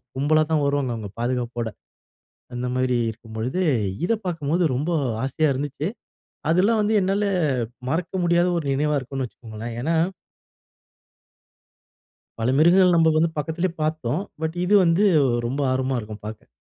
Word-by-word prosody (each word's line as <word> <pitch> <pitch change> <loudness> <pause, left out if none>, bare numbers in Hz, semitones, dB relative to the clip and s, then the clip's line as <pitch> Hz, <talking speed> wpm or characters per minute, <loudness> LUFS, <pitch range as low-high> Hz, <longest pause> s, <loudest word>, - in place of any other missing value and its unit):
கும்பலா 155 +3 +3
தான் 155 -2 +2
வருவாங்க 140 -3 0
அவங்க 105 -3 -6
பாதுகாப்போட. 120 -1 -2 0.9
அந்த 125 +1 -3
மாரி 130 -1 +1
இருக்கும்பொழுது 115 - -5 0.5
இத 230 - +2
பார்க்கும்போது 165 0 0
ரொம்ப 145 +7 -1 0.3
ஆசையா 145 +3 +1
இருந்துச்சி. 145 +3 -3 0.6
அதெல்லாம் 200 +7 +3
வந்து 215 +1 +1
என்னால 195 +2 +1 0.6
மறக்க 170 +5 -2
முடியாத 175 +1 +3
ஒரு 160 - -3
நினைவா 150 +1 +1
இருக்கும்னு 135 0 -4
வச்சுக்கோங்களேன். 115 -1 -8
ஏனா 165 +4 0 2.5
பல 120 +3 +1
மிருகங்கள் 180 +3 +5
நம்ம 160 -1 +5
வந்து 165 +2 +3
பக்கத்திலேயே 165 +4 -1
பார்த்தோம். 155 0 -1 0.2
பட் 160 +2 -2
இது 200 +3 +2
வந்து 170 +5 +3 0.4
ரொம்ப 135 +4 -2
ஆர்வமா 130 0 0
இருக்கும் 105 -1 -9
பார்க்க. 110 0 -8
145 Hz, 130 wpm, -23 LUFS, 125-170 Hz, 2.5 s, மிருகங்கள்